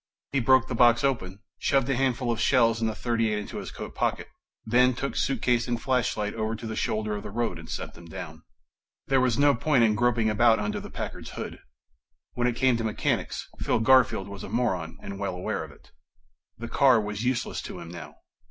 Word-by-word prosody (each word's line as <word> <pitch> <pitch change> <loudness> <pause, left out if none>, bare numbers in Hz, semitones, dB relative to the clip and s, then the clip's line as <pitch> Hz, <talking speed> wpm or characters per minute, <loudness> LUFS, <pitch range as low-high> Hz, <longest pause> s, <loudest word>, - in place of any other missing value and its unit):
He 140 - +1
broke 130 0 +4
the - - -4
box 120 0 +5
open, 100 -8 -1 0.2
shoved 135 -2 +2
a 135 - +1
handful 125 -1 0
of 115 - -2
shells 115 -3 +3
and 110 - +1
the 110 - -4
.38 115 -3 0
into 105 - -6
his - - -5
coat - - -8
pocket, - - -1 0.4
then 125 +2 +4
took 140 +2 -3
suitcase 125 -2 +1
and 120 -1 -1
flashlight 120 -5 0
over 110 0 -2
to 115 - -8
the 110 0 -4
shoulder 110 -1 -1
of 105 - -5
the - - -7
road 110 -5 -2
and 80 - -11
set - - -5
them 85 - -14
down. 80 -2 -8 0.6
There 135 -1 +2
was 125 -3 +2
no 145 0 +5
point 130 0 +2
in 110 -2 +4
groping 120 0 +2
about 110 +1 +4
under 105 0 -2
the - - -9
Packard's - - -6
hood. - - -6 0.7
When 120 0 0
it 120 - 0
came 130 -1 +3
to 115 - -3
mechanics, 110 -1 -1
Phil - - +1
Garfield 125 -4 +4
was 100 -1 -8
a - - -7
moron 95 -8 -1
and 100 0 -6
well 100 -3 -2
aware 90 - -3
of - - -9
it. - - -19 0.7
The 115 - -6
car 130 -1 +4
was 105 0 -4
useless 125 -1 -1
to - - -8
him - - -9
now 80 -4 -9
115 Hz, 215 wpm, -27 LUFS, 105-125 Hz, 0.7 s, box